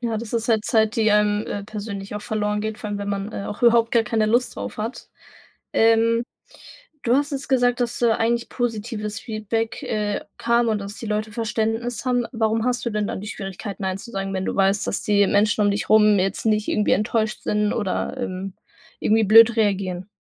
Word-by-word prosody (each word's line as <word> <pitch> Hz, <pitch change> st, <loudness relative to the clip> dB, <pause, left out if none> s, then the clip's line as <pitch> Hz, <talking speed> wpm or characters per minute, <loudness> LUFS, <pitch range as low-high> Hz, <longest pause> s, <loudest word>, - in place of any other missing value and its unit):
Ja, 230 Hz, -2 st, -1 dB
das 230 Hz, -1 st, -7 dB
ist 230 Hz, 0 st, -1 dB
halt 220 Hz, -2 st, +2 dB
Zeit, 220 Hz, 0 st, +2 dB
die 220 Hz, -1 st, +3 dB
einem, 210 Hz, 0 st, +2 dB
äh, 200 Hz, -1 st, -4 dB
persönlich 205 Hz, -1 st, -6 dB
auch 210 Hz, -, -4 dB
verloren 210 Hz, -2 st, -1 dB
geht, 215 Hz, 0 st, -3 dB
vor 210 Hz, -, -6 dB
allem 205 Hz, -, -3 dB
wenn 200 Hz, 0 st, -4 dB
man, 200 Hz, +1 st, -3 dB
äh, 200 Hz, -, -5 dB
auch 205 Hz, -, -7 dB
überhaupt 235 Hz, -1 st, +4 dB
gar 230 Hz, -1 st, +4 dB
keine 220 Hz, 0 st, 0 dB
Lust 240 Hz, +3 st, +1 dB
drauf -, -, -6 dB
hat. 220 Hz, +3 st, -5 dB, 0.6 s
Ähm, 230 Hz, +1 st, +3 dB, 0.8 s
du 240 Hz, -, +3 dB
hast 290 Hz, +2 st, +1 dB
jetzt 275 Hz, -1 st, -4 dB
gesagt, 245 Hz, -2 st, +2 dB
dass 240 Hz, 0 st, -1 dB
da 235 Hz, -2 st, +3 dB
eigentlich 235 Hz, +1 st, 0 dB
positives 225 Hz, -2 st, -3 dB
Feedback, 225 Hz, 0 st, -3 dB
äh, 210 Hz, -1 st, -2 dB, 0.2 s
kam 235 Hz, 0 st, +2 dB
und 215 Hz, -1 st, +1 dB
dass 200 Hz, +1 st, -7 dB
die 230 Hz, -, -7 dB
Leute 215 Hz, +1 st, -2 dB
Verständnis 225 Hz, +1 st, -2 dB
haben. 245 Hz, -2 st, +1 dB
Warum 225 Hz, -1 st, 0 dB
hast 245 Hz, -1 st, 0 dB
du -, -, +1 dB
denn 210 Hz, -1 st, -1 dB
dann -, -, -4 dB
die 205 Hz, -, -8 dB
Schwierigkeiten, 195 Hz, 0 st, -6 dB
Nein 190 Hz, 0 st, -1 dB
zu 235 Hz, -, -10 dB
sagen, 195 Hz, -2 st, -4 dB
wenn 190 Hz, -, -2 dB
du -, -, -2 dB
weißt, 195 Hz, +1 st, +2 dB
dass -, -, -2 dB
die 205 Hz, -1 st, +3 dB
Menschen 210 Hz, +1 st, +2 dB
um 205 Hz, -, +3 dB
dich 200 Hz, +1 st, -2 dB
rum 210 Hz, -2 st, +5 dB
jetzt 195 Hz, +1 st, -1 dB
nicht 215 Hz, -1 st, +1 dB
irgendwie 210 Hz, -, +1 dB
enttäuscht 215 Hz, +1 st, 0 dB
sind 210 Hz, 0 st, 0 dB
oder, 205 Hz, +3 st, -2 dB
ähm, 195 Hz, -5 st, -4 dB, 0.5 s
irgendwie 220 Hz, 0 st, +3 dB
blöd 225 Hz, +3 st, +7 dB
reagieren? 190 Hz, -4 st, 0 dB
215 Hz, 210 wpm, -22 LUFS, 205-230 Hz, 0.8 s, blöd